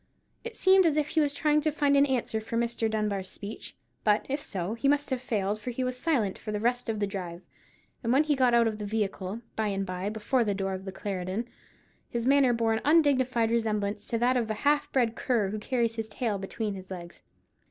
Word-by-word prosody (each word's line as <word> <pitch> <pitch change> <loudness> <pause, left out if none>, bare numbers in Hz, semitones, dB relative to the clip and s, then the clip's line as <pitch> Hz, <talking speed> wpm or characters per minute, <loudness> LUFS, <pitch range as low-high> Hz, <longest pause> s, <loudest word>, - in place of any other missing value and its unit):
It 470 -1 -6
seemed 380 -1 +5
as 305 -2 +1
if 300 0 +1
he 320 - +1
was 290 -1 +2
trying 300 +1 +2
to 310 - +1
find 285 -1 +2
an 280 +1 +5
answer 240 -4 -1
for 225 +1 -4
Mr. 235 -1 0
Dunbar's 210 -3 -1
speech: 205 +3 -8 0.3
but, 210 0 +3
if 280 +2 -2
so, 190 -3 -3
he 235 +4 -1
must 290 0 +2
have 255 -2 -1
failed, 215 -4 -1
for 250 - -4
he 245 +2 -2
was 255 0 -1
silent 250 - 0
for 215 - -5
the 210 - -2
rest 245 +2 0
of 220 -2 -1
the 205 - +1
drive: 180 -3 -6 0.6
and 230 - 0
when 275 +4 +5
he 300 -1 +1
got 255 -3 +3
out 235 -1 +5
of 215 -1 -3
the 210 - -4
vehicle, 205 0 -2
by 220 -1 0
and 195 -1 -1
by, 185 +1 -3
before 220 +4 0
the 205 -3 0
door 195 0 -2
of 190 +1 -6
the 190 - -5
Clarendon, 190 +3 -3 0.6
his 235 -1 -2
manner 275 -1 +5
bore 230 -1 +1
an 220 - -1
undignified 260 -7 +3
resemblance 210 -2 -1
to 230 - -1
that 250 +2 +2
of 230 -2 -1
a 215 - -1
half 290 0 +2
bred 235 -4 +1
cur 225 -6 0
who 215 - -3
carries 230 0 -1
his 220 -1 -3
tail 220 -5 -2
between 205 +2 -3
his 190 -1 -9
legs. 175 -2 -8
225 Hz, 235 wpm, -28 LUFS, 205-260 Hz, 0.6 s, seemed